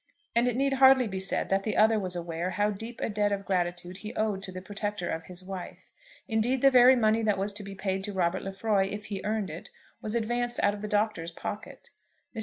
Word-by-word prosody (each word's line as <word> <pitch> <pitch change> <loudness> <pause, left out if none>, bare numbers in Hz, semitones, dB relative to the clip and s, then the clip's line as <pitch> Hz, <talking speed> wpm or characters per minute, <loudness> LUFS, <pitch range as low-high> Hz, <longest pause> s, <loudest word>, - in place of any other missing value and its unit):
And 235 +1 +3
it 245 - 0
need 275 +1 +1
hardly 265 -1 +6
be 190 -2 -4
said 190 +1 -1
that 195 0 +2
the 215 +2 -2
other 220 0 +5
was 185 -2 -2
aware 170 0 -3
how 205 +3 +1
deep 225 +4 -7
a - - 0
debt 210 -1 0
of 200 -1 -2
gratitude 175 -1 -2
he 215 +1 -8
owed 210 -3 0
to 195 -1 -7
the 185 - -6
protector 205 -1 -4
of 160 0 -4
his 180 0 -5
wife. 190 -2 -8 0.4
Indeed 245 +3 +1
the 275 - +7
very 255 0 +8
money 220 -2 +3
that 210 -3 +1
was 200 +2 -1
to 205 0 -6
be 195 0 -8
paid 190 0 -2
to 205 - -4
Robert 185 -1 0
Lefroy, 195 0 0
if 210 +2 -6
he 200 -3 -5
earned 210 -4 -1
it, 165 - -8 0.3
was 215 +1 -3
advanced 240 +1 0
out 205 - +4
of 205 - -7
the 210 - -4
Doctor's 210 -5 0
pocket. 210 +5 -7 0.4
Mr. - - -4
205 Hz, 235 wpm, -28 LUFS, 190-220 Hz, 0.4 s, very